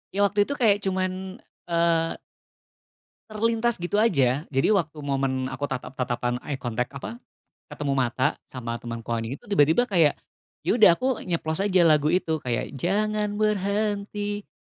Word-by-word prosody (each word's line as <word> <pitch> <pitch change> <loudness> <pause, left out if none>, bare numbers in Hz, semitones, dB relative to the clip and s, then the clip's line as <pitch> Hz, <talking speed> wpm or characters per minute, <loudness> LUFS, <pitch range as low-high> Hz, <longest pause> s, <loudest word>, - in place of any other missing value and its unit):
Ya, - - -1
waktu 205 +1 +2
itu - - -2
kayak 220 -7 +4
cuman, 185 -1 0 0.6
eee 170 -1 +1 1.1
terlintas 230 +2 +1
gitu 175 +4 -1
aja. 145 - +2
Jadi 135 +7 +1
waktu 165 -7 0
momen 135 -2 -1
aku 140 +2 -3
tatap-tatapan, 125 -2 -3
eye 145 - -2
contact 125 0 -3
apa, 230 - -7 0.5
ketemu 145 -2 -3
mata 130 +2 0
sama 120 -2 -5
temanku 115 -1 -6
ini, 115 +4 -4
itu - - -19
tiba-tiba 160 +4 +4
kayak, 175 -10 +3 0.5
ya, - - +1
udah 185 -6 +8
aku 255 +4 -1
nyeplos 160 -2 -1
aja 190 -3 +3
lagu 150 -2 +4
itu, 160 -1 +1
kayak 120 -4 -2
jangan 210 +3 0
berhenti 205 0 -1
170 Hz, 145 wpm, -25 LUFS, 135-205 Hz, 1.1 s, udah